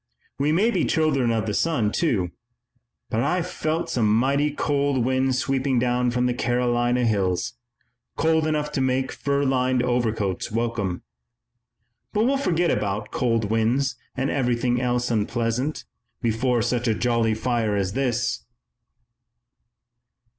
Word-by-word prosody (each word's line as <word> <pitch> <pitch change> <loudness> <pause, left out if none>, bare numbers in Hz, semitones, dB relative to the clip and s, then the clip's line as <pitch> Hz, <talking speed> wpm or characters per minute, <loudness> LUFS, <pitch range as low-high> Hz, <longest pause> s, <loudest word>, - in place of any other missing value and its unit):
We 145 +2 +2
may 205 +9 +3
be 180 -6 +1
children 140 -6 +1
of 115 -2 0
the 105 - -2
sun, 120 -7 +1
too, 105 - 0 0.8
but 110 - 0
I've 165 +7 +1
felt 160 -1 -2
some 110 -4 +1
mighty 135 +6 +2
cold 140 -3 0
winds 130 0 +1
sweeping 135 0 0
down 125 0 +1
from 125 +1 0
the 125 - +1
Carolina 120 0 +1
hills, 100 +1 0 0.6
cold 160 0 +2
enough 150 -1 -1
to 140 - -1
make 130 0 0
fur 140 0 -1
lined 130 -2 +1
overcoats 115 -5 -1
welcome. 115 -5 -2 1.1
But 215 +2 +2
we'll 275 +2 +2
forget 175 - +1
about 105 0 -2
cold 115 -4 0
winds 125 +4 +1 0.2
and 135 +1 0
everything 125 -2 0
else 125 -1 0
unpleasant, 115 +5 -1 0.3
before 120 0 +1
such 120 +1 0
a 110 - +2
jolly 115 -1 +1
fire 115 -2 0
as 95 -1 -1
this." 125 -2 -1
125 Hz, 135 wpm, -24 LUFS, 115-140 Hz, 1.1 s, may